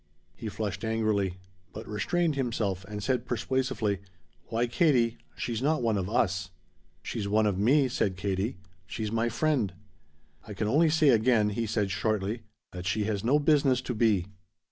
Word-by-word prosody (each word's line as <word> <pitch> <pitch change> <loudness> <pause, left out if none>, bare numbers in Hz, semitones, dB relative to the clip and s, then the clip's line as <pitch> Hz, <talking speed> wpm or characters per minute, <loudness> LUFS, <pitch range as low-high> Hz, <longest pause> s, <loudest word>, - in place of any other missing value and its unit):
He 110 - -5
flushed 105 +1 -4
angrily. 110 -4 0 0.4
But 110 +2 -8
restrained 160 +11 0
himself 110 -8 -1
and 105 0 -6
said 125 -1 0
persuasively: 125 -5 -1 0.5
"Why, 115 +1 0
Katie, 120 -3 +2 0.2
she's 120 -1 -3
not 150 -1 +1
one 115 -2 +2
of 95 -1 -2
us." 95 -4 0 0.5
"She's 100 - -3
one 110 +2 +3
of 100 -3 0
me," 135 +6 +4
said 100 -6 -1
Katie. 95 +3 -2 0.3
"She's 105 +3 -4
my 115 +1 +1
friend." 120 -4 0 0.7
"I 105 - -7
can 105 +2 -1
only 155 +8 +4
say 155 -2 +4
again," 115 -3 +4
he 115 +2 -2
said 105 -2 0
shortly, 105 +2 -1 0.3
"that 90 -1 -6
she 105 +2 +1
has 105 -1 -2
no 130 +6 +4
business 145 -4 +3
to 130 - -4
be." 105 -6 +2
110 Hz, 165 wpm, -28 LUFS, 100-125 Hz, 0.7 s, me